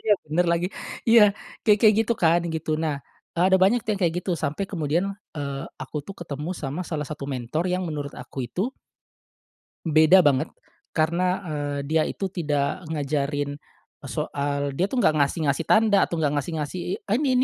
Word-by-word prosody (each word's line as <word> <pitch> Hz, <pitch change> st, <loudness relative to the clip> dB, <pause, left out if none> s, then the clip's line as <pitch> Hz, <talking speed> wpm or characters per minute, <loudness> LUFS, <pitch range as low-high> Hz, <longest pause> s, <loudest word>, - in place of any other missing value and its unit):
Iya 215 Hz, -, +3 dB
bener 160 Hz, +4 st, +2 dB
lagi 170 Hz, +1 st, +1 dB, 0.4 s
iya 230 Hz, -1 st, +8 dB, 0.4 s
kayak 210 Hz, -1 st, +5 dB
kayak 215 Hz, -1 st, +6 dB
gitu 225 Hz, -, 0 dB
kan 170 Hz, +1 st, +5 dB
gitu 160 Hz, 0 st, -3 dB
nah, 155 Hz, -2 st, 0 dB, 0.4 s
eee, 170 Hz, -, +3 dB
ada 190 Hz, -, +7 dB
banyak 220 Hz, +6 st, +5 dB
tuh -, -, -1 dB
yang 200 Hz, -, -7 dB
kayak 170 Hz, -1 st, +2 dB
gitu -, -, -3 dB
sampai 160 Hz, +4 st, -2 dB
kemudian, 165 Hz, 0 st, 0 dB, 0.3 s
eee, 140 Hz, -2 st, -3 dB, 0.2 s
aku 130 Hz, -, -7 dB
tuh 195 Hz, -, -7 dB
ketemu 150 Hz, 0 st, -5 dB
sama 145 Hz, +4 st, -3 dB
salah 150 Hz, -3 st, -2 dB
satu 150 Hz, -2 st, -6 dB
mentor 130 Hz, +6 st, -2 dB
yang 185 Hz, +1 st, 0 dB
menurut 145 Hz, -2 st, -4 dB
aku 125 Hz, +2 st, -9 dB
itu 180 Hz, +10 st, -2 dB, 1.2 s
beda 160 Hz, +3 st, +6 dB
banget 145 Hz, -6 st, +2 dB, 0.4 s
karena, 170 Hz, +3 st, +1 dB, 0.2 s
eee, 145 Hz, -2 st, -2 dB
dia 160 Hz, 0 st, +3 dB
itu 195 Hz, -, -3 dB
tidak 150 Hz, -1 st, -1 dB
ngajarin, 145 Hz, -1 st, -1 dB, 0.5 s
soal 140 Hz, 0 st, -2 dB
dia 180 Hz, +8 st, 0 dB
tuh 260 Hz, -, -4 dB
gak 155 Hz, -, +4 dB
ngasih 150 Hz, +2 st, +1 dB
ngasih 140 Hz, +4 st, +1 dB
tanda 215 Hz, -2 st, +5 dB
atau 170 Hz, -, -3 dB
gak 145 Hz, -2 st, +2 dB
ngasih 145 Hz, +4 st, -2 dB
ngasih, 150 Hz, +5 st, -4 dB, 0.2 s
eee, 210 Hz, -, +1 dB
"Ini 285 Hz, -3 st, +1 dB
155 Hz, 180 wpm, -25 LUFS, 145-180 Hz, 1.2 s, iya